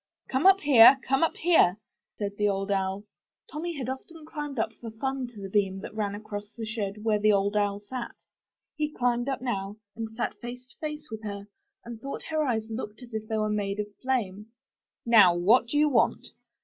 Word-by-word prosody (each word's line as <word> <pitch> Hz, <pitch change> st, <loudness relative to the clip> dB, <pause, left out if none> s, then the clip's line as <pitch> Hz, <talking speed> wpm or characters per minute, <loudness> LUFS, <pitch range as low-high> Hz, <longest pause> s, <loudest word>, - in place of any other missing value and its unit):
Come 270 Hz, +7 st, +3 dB
up 390 Hz, 0 st, +6 dB
here! 265 Hz, -2 st, +8 dB
come 270 Hz, +1 st, +2 dB
up 330 Hz, -, +1 dB
here!*' 315 Hz, -, +4 dB, 0.4 s
said 200 Hz, -1 st, -3 dB
the 210 Hz, 0 st, +2 dB
Old 195 Hz, 0 st, -2 dB
Owl. 195 Hz, 0 st, -1 dB, 0.5 s
Tommy 325 Hz, +1 st, -4 dB
had 255 Hz, -3 st, -4 dB
often 300 Hz, +5 st, -7 dB
climbed 295 Hz, -3 st, -6 dB
up 220 Hz, 0 st, -1 dB
for 230 Hz, -, -6 dB
fun 265 Hz, +3 st, -3 dB
to 235 Hz, -3 st, -13 dB
the 195 Hz, -, -5 dB
beam 195 Hz, -1 st, +1 dB
that -, -, -8 dB
ran 205 Hz, -2 st, -2 dB
across 205 Hz, 0 st, -7 dB
the 225 Hz, -, -5 dB
shed 210 Hz, -1 st, -4 dB
where 215 Hz, -2 st, +2 dB
the 215 Hz, +1 st, +4 dB
Old 200 Hz, +1 st, +1 dB
Owl 205 Hz, -1 st, +1 dB
sat. 240 Hz, +3 st, -6 dB, 0.6 s
He 300 Hz, -1 st, -1 dB
climbed 245 Hz, -1 st, 0 dB
up 265 Hz, -2 st, -3 dB
now, 200 Hz, -4 st, -3 dB, 0.2 s
and 225 Hz, -1 st, -4 dB
sat 235 Hz, -, -3 dB
face 245 Hz, +1 st, -8 dB
to -, -, -18 dB
face 300 Hz, -3 st, -6 dB
with 220 Hz, -1 st, -6 dB
her, 200 Hz, -1 st, -6 dB, 0.4 s
and 235 Hz, -1 st, -8 dB
thought 275 Hz, +2 st, -6 dB
her 310 Hz, -1 st, +1 dB
eyes 225 Hz, -6 st, 0 dB
looked 225 Hz, +1 st, -6 dB
as 240 Hz, -1 st, -13 dB
if 220 Hz, 0 st, -4 dB
they 220 Hz, -, -1 dB
were 215 Hz, 0 st, +1 dB
made 205 Hz, -1 st, -2 dB
of 210 Hz, -1 st, -4 dB
flame. 215 Hz, -6 st, -2 dB, 0.6 s
Now, 210 Hz, -7 st, +7 dB
what 220 Hz, +8 st, +4 dB
do 290 Hz, -, -1 dB
you 300 Hz, +1 st, +5 dB
want?'' 285 Hz, -, +1 dB
220 Hz, 210 wpm, -27 LUFS, 205-260 Hz, 0.6 s, here